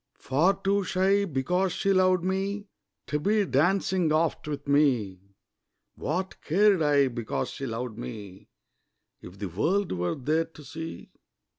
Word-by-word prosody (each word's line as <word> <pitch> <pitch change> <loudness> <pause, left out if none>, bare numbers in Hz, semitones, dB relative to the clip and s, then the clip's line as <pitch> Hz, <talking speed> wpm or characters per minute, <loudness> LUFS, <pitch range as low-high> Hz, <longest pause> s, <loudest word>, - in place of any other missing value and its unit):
Far 160 +9 +2
too 200 +1 +2
shy, 190 +2 +2
because 180 +4 0
she 195 - +1
loved 185 -1 +3
me, 195 +2 -2 0.4
To 150 - -1
be 205 +5 +2
dancing 180 +2 +2
oft 155 0 0
with 145 -1 -5
me; 130 -10 +2 0.7
What 185 +5 -3
cared 195 +2 +3
I, 145 -2 +4
because 120 -3 -3
she 135 - -5
loved 115 -1 -5
me, 100 -6 -8 0.7
If 90 +2 -12
the 100 0 -4
world 180 - 0
were 90 -1 -1
there 155 +5 0
to 155 -2 -15
see? 160 +3 -8
160 Hz, 140 wpm, -27 LUFS, 130-190 Hz, 0.7 s, I